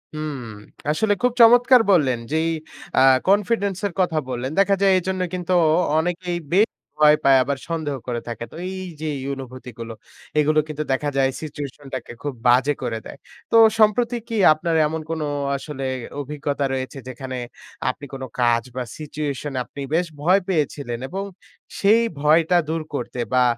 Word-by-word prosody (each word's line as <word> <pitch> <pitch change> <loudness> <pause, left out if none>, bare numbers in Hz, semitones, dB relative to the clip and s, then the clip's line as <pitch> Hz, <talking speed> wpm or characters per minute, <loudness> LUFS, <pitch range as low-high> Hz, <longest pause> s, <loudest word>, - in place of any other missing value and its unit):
হুম, 155 -2 -4 0.5
আসলে 205 +7 +2
খুব 250 0 +3
চমৎকার 245 +2 +7
বললেন 135 -10 +3
যে - - 0
এই - - +1 0.5
আ - - +6 0.3
কনফিডেন্স 200 -1 +2
এর 195 - -9
কথা 175 -4 0
বললেন। 125 +1 -3
দেখা 195 0 +4
যায় 195 - +5
এজন্যই 185 0 -2
কিন্তু 180 0 -2 0.4
অনেকেই 175 +1 -1 0.2
বেশ 210 +4 +5 0.3
ভয় 150 0 +6
পায়, 135 -1 +6
আবার 140 +1 -2
সন্দেহ 155 -4 -2
করে 120 -1 -2
থাকে। 115 0 -5
তো - - -12
এই 190 0 -5 0.2
যে 160 - -2
এই 130 - -6
অনুভূতিগুলো 125 -3 -8 0.5
এগুলো 155 +1 +3
কিন্তু 150 0 -4
দেখা 145 +2 -1
যায় 135 -1 +3
সিচুয়েশনটাকে 140 -4 -7
খুব 145 - -2
বাজে 130 +4 +4
করে 115 -2 -2
দেয়। - - -9 0.3
তো - - +2 0.2
সম্প্রতি 230 +3 +3
কি 230 - -4 0.2
আপনার 165 +2 -2
এমন 160 +1 -4
কোন 165 -1 -2 0.4
আসলে 135 -1 -7 0.4
অভিজ্ঞতা 145 0 -2
রয়েছে 130 +1 -4
যেখানে 130 0 -6 0.5
আপনি 145 +3 -5
কোন 135 -1 -6 0.2
কাজ 120 -1 +3
বা 130 - -2
সিচুয়েশনে 145 -2 -4
আপনি 140 - -9
বেশ 175 +1 +1
ভয় 180 +6 +4
পেয়েছিলেন 145 -8 -1
এবং 195 +6 -4 0.6
সেই 215 +3 +5 0.2
ভয়টা 160 +4 +4
দূর 160 0 -1
করতে 125 -2 -4
বা 125 0 +5
150 Hz, 160 wpm, -22 LUFS, 135-180 Hz, 0.6 s, চমৎকার